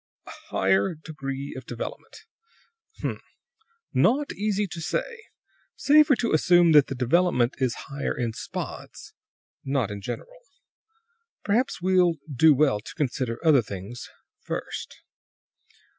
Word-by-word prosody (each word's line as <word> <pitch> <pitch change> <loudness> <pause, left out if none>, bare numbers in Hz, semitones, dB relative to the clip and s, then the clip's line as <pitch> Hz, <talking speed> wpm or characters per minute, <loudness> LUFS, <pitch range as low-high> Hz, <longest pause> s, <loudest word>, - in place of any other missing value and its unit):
"A - - -10 0.2
higher 95 - +2
degree 140 -3 -6
of 130 -1 -9
development? 125 - -8 0.7
H - - -7
m! - - -2 0.7
Not 285 +3 +2
easy 210 0 -1
to 175 -3 -7
say. 470 - -3 0.5
Safer 295 -1 +5
to 235 -1 -1
assume 175 +2 +5
that 150 -3 +6
the 135 - -4
development 125 -1 +2
is 130 -3 0
higher 140 0 -3
in 115 -2 -2
spots, - - -7 0.5
not 135 -6 -1
in 100 -1 -6
general. 120 +9 -7 1.0
Perhaps 220 -2 0
we'll 180 -2 +3 0.2
do 160 +5 +6
well 135 -6 +3
to 105 - -11
consider 130 -5 -2
other 150 -5 +6
things 100 +3 -8 0.3
first. - - -6
150 Hz, 125 wpm, -25 LUFS, 125-185 Hz, 1.0 s, that